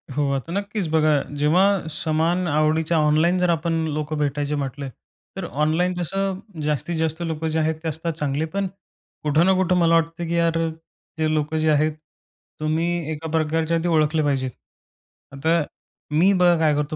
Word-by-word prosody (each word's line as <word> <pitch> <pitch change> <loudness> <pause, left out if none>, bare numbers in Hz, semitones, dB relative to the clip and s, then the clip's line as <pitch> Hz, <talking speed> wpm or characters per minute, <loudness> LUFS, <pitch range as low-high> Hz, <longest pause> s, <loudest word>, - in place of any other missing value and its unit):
हो, 145 -1 +1
आता 135 +4 -3
नक्कीच. 200 -1 -2
बघा, 155 -2 +3 0.2
जेव्हा 180 +4 +3
समान 165 +4 0
आवडीच्या 155 +2 +2
ऑनलाईन 155 +4 +3
जर 180 0 +2
आपण 165 0 0 0.2
लोकं 155 +1 -3
भेटायचे 145 0 -1
म्हटले, 140 -1 -4 0.5
तर 190 - -3
ऑनलाईन 160 +5 0
जसं 190 +2 -2 0.2
जास्तीत 150 +3 -1
जास्त 160 +1 -1
लोकं 160 -1 -2
जे 160 0 0
आहेत 160 0 +1
ते - - -3
असतात 165 +2 -3
चांगले 150 0 -1
पण. 195 +4 -2 0.6
कुठं 155 +3 +3
ना 190 - +5
कुठं 185 -1 +2
मला 165 -1 +4
वाटतं, 165 +1 0
की 170 - -1
यार 165 -1 +2 0.6
जे 155 -1 +1
लोकं 155 +1 -1
जे 155 0 +2
आहेत 155 +1 +2 0.7
तुम्ही 160 +1 -1
एका 160 +1 -5
प्रकारच्या 160 +1 +1
ते - - 0
ओळखले 155 -1 +2
पाहिजेत. 135 -3 0 0.8
आता 160 +5 +1 0.6
मी 190 +4 +5
बघा 180 -2 +4
काय 155 -2 +3
करतो 150 +1 -2
160 Hz, 165 wpm, -23 LUFS, 150-170 Hz, 0.8 s, ना